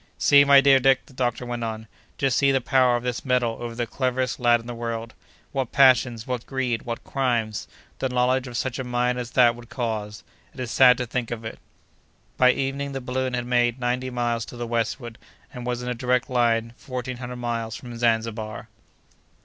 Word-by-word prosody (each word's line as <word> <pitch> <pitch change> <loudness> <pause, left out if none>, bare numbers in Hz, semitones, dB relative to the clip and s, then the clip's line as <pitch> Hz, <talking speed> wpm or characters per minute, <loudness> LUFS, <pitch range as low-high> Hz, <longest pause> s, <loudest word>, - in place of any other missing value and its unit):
"See, 140 -1 +6
my 140 -1 +7
dear 135 -1 +6
Dick!" 135 0 +3
the - - -18
doctor 125 -1 -2
went 120 -1 -4
on. 110 -1 -4 0.3
"Just 135 -3 +1
see 140 -1 +4
the 135 - +2
power 130 -1 +3
of 120 - -2
this 125 -1 -3
metal 125 -3 +1
over 120 -1 -5
the 120 0 -1
cleverest 130 +1 -1
lad 120 -1 +4
in 115 - -13
the 120 - -6
world! 115 -1 -5 0.4
What 135 -4 -2
passions, 125 -4 +4
what 125 -2 -4
greed, 130 -4 -1
what 115 -1 -5
crimes, 120 -6 -1 0.3
the 130 - -1
knowledge 125 +1 +1
of 120 -1 -5
such 130 +1 -2
a - - -2
mine 125 0 0
as 120 -1 -5
that 120 -2 +5
would 120 0 -13
cause! 110 -4 -4 0.3
It - - -12
is 125 -2 -4
sad 125 -2 +6
to 125 - -2
think 120 0 -3
of 115 -1 -5
it!" 110 - -7 0.8
By 125 0 +5
evening 140 +1 -3
the 135 - -3
balloon 130 0 -2
had 120 0 -3
made 120 0 +1
ninety 125 +1 -1
miles 120 -2 -1
to 120 - -11
the 120 - -4
westward, 115 0 -3 0.3
and 125 -1 -7
was, 125 0 -2
in - - -5
a - - 0
direct 125 +1 0
line, 115 -2 +1
fourteen 130 -1 -5
hundred 125 0 -6
miles 115 -2 -3
from 120 -2 -9
Zanzibar. 115 -2 -1
125 Hz, 205 wpm, -24 LUFS, 115-130 Hz, 0.8 s, my